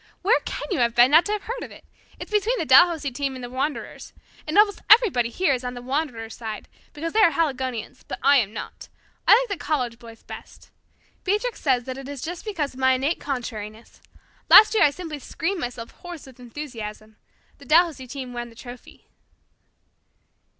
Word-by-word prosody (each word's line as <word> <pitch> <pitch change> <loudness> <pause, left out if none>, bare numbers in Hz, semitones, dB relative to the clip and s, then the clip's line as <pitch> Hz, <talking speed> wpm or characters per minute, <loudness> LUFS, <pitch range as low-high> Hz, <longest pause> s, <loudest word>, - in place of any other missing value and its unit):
"Where 440 +6 +4
can - - -5
you 355 - 0
have 235 -1 +1
been 245 +2 +6
not 320 +3 +6
to 415 - -2
have 425 -1 -2
heard 480 +2 -5
of - - -7
it? - - -15 0.3
It's - - -8
between 425 +4 +1
the - - -2
Dalhousie 320 -5 +5
team 275 +1 -3
and 255 - -8
the 245 - -7
Wanderers. 275 +4 -4 0.3
Almost 405 +6 +3
everybody 390 - +5
here 295 +3 +1
is 255 -1 -3
on 250 0 -5
the 245 - -7
Wanderers' 250 -5 -3
side, 220 -3 -7 0.2
because 330 +2 -5
they 445 - +2
are 415 - +7
Haligonians, 265 -7 -3
but - - -5
I 285 - +6
am 215 -6 +1
not. 220 - -8 0.4
I - - +8
like - - -2
the - - -10
college 250 -6 -2
boys 230 -1 -14
best. - - -12 0.5
Beatrix 420 +5 -1
says 255 -4 +1
that 260 +1 -6
it 270 0 -9
is 280 -3 -7
just 345 +4 -6
because 325 -11 -3
of 255 - -13
my 260 0 +4
innate 275 +6 -1
contrariness. 225 -5 -6 0.5
Last 430 - +9
year 435 - +2
I 295 - +7
simply 310 -1 -7
screamed 355 +7 -3
myself 240 -1 -6
hoarse 350 -3 -10
with 260 -2 -16
enthusiasm. 225 -5 -8 0.4
The 280 - -14
Dalhousie 315 -3 +2
team 255 -1 -7
won 240 0 -5
the 230 - -18
trophy." 245 +1 -12
270 Hz, 195 wpm, -23 LUFS, 245-335 Hz, 0.5 s, Last